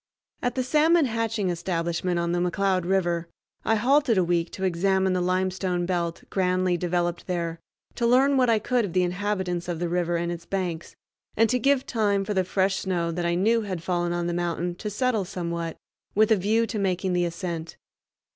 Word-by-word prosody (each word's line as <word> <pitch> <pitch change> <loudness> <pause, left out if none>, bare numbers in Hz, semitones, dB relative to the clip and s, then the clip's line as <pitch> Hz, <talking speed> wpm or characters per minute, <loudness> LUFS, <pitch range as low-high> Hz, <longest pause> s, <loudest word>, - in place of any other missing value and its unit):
At 245 0 -1
the 260 - 0
salmon 310 +4 +4
hatching 225 -5 -1
establishment 175 0 -1
on 170 0 0
the 175 - +1
McCloud 185 +1 +1
River 175 -3 0 0.4
I 225 - +2
halted 250 0 +3
a 185 - +4
week 170 -1 0
to 190 - -5
examine 190 +1 +2
the 180 - 0
limestone 185 0 0
belt, 170 -2 -2
grandly 185 -1 +1
developed 175 0 -1
there, 170 -2 -2 0.3
to 235 - 0
learn 265 +4 +4
what 255 -2 +3
I 225 - +4
could 240 +3 +1
of 190 -5 -4
the 185 - +3
inhabitants 180 -1 -2
of 175 -2 -2
the 175 +1 -2
river 175 0 0
and 170 0 -2
its 170 -1 -7
banks, 180 -4 -3 0.4
and 225 +1 +5
to 250 - +2
give 275 +2 +2
time 205 -4 +1
for 210 - -2
the 190 -1 +2
fresh 190 +1 +1
snow 175 -3 -1
that 170 +1 -2
I 170 - +1
knew 225 +6 +3
had 185 -6 -5
fallen 175 -1 0
on 175 0 -1
the 175 - -1
mountain 175 0 -1
to 210 - -4
settle 225 0 0
somewhat, 170 -3 -4 0.4
with 215 +2 +4
a - - +7
view 215 +4 +2
to 225 -2 -4
making 185 -1 0
the 175 0 +2
ascent. 170 -1 -5
185 Hz, 200 wpm, -25 LUFS, 175-210 Hz, 0.4 s, a